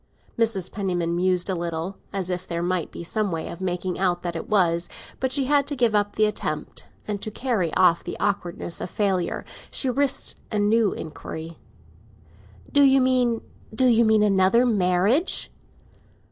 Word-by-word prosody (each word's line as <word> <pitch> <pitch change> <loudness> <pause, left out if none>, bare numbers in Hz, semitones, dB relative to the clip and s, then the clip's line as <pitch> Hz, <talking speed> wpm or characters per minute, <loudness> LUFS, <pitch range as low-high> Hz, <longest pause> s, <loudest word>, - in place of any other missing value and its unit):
Mrs. 220 -6 0
Penniman 180 -4 -1
mused 180 0 +1
a 190 - 0
little, 170 +2 -4
as 190 -2 -2
if 180 +1 -4
there 170 0 -2
might 180 -2 -1
be - - -8
some 210 +3 -1
way 165 -1 -3
of 170 - -8
making 180 -1 -2
out 180 -2 +1
that 175 -1 -3
it 165 - -6
was; 175 -4 +2 0.3
but 260 -1 -1
she 275 0 +1
had 285 0 +2
to 290 - -1
give 240 -4 +2
up 205 -1 +1
the 215 - +4
attempt, 155 -8 -3 0.2
and, 205 -2 -3
to - - -4
carry 215 -7 -1
off 175 -2 +4
the - - -6
awkwardness 180 -4 -2
of - - -4
failure, 190 -4 -1 0.2
she 260 - 0
risked 275 +1 +1
a 215 - -1
new 210 +1 +3
inquiry. 160 +1 -7 1.1
"Do 285 - +4
you 270 -1 +6
mean—do 250 -2 0
you 235 -2 +5
mean 220 -1 +4
another 200 +4 +4
marriage?" 205 - +1
195 Hz, 170 wpm, -24 LUFS, 175-230 Hz, 1.1 s, you